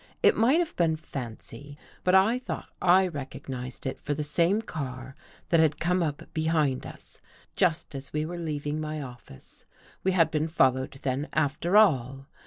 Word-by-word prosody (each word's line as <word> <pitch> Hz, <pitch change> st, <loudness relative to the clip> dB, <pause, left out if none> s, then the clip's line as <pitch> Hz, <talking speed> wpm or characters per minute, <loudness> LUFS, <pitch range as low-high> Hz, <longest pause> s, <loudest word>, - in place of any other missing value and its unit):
It -, -, +6 dB
might 245 Hz, +8 st, +4 dB
have 345 Hz, -2 st, -1 dB
been 165 Hz, -2 st, +2 dB
fancy, 140 Hz, -1 st, -8 dB, 0.3 s
but 185 Hz, +1 st, +4 dB
I 215 Hz, +6 st, +4 dB
thought 255 Hz, -, -6 dB
I 185 Hz, +1 st, +5 dB
recognized 135 Hz, -4 st, -6 dB
it 130 Hz, -, -4 dB
for 145 Hz, -, -2 dB
the 150 Hz, -, -2 dB
same 170 Hz, +7 st, +2 dB
car 135 Hz, -, -6 dB, 0.3 s
that 165 Hz, -, +4 dB
had 155 Hz, -2 st, +3 dB
come 180 Hz, +2 st, +1 dB
up 150 Hz, -3 st, -2 dB
behind 155 Hz, -5 st, +1 dB
us -, -, -14 dB, 0.4 s
just 165 Hz, -3 st, +1 dB
as 135 Hz, 0 st, -7 dB
we 155 Hz, 0 st, -1 dB
were 175 Hz, +2 st, -5 dB
leaving 150 Hz, -2 st, -3 dB
my 155 Hz, 0 st, -4 dB
office. 120 Hz, -, -11 dB, 0.4 s
We 190 Hz, -, +2 dB
had 165 Hz, -3 st, +3 dB
been 155 Hz, 0 st, 0 dB
fol 135 Hz, -5 st, +4 dB
lowed 130 Hz, +1 st, -5 dB
then, 135 Hz, +3 st, -1 dB
after 155 Hz, +6 st, +2 dB
all. 135 Hz, -, +3 dB
155 Hz, 175 wpm, -27 LUFS, 135-175 Hz, 0.4 s, It